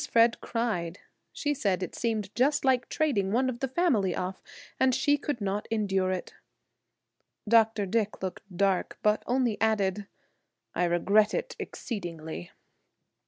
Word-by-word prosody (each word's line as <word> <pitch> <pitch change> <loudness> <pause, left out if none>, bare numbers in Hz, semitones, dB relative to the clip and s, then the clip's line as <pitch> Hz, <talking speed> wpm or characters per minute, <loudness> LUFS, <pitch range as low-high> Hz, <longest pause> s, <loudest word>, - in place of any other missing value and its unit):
Fred 230 0 +4
cried. 205 -8 -2 0.3
She 290 -1 -1
said 195 -9 0
it 180 - -5
seemed 215 -4 -2
just 275 +4 +2
like 260 -2 +2
trading 210 -12 +1
one 255 +4 +2
of 240 - -8
the 270 - -1
family 255 - +1
off, 185 +1 -4 0.4
and 260 -1 +4
she 290 +2 +3
could 290 -3 -3
not 200 0 -2
endure 195 -4 +1
it. 185 -1 -4 1.1
Dr. 225 -2 +4
Dick 210 0 -1
looked 185 - -4 0.2
dark, 195 -1 +1
but 210 0 +3
only 245 -4 +1
added, 205 -2 +1 0.7
"I 180 - +1
regret 200 +5 +3
it 485 - -3
exceedingly." 165 - -6
215 Hz, 140 wpm, -28 LUFS, 190-245 Hz, 1.1 s, Fred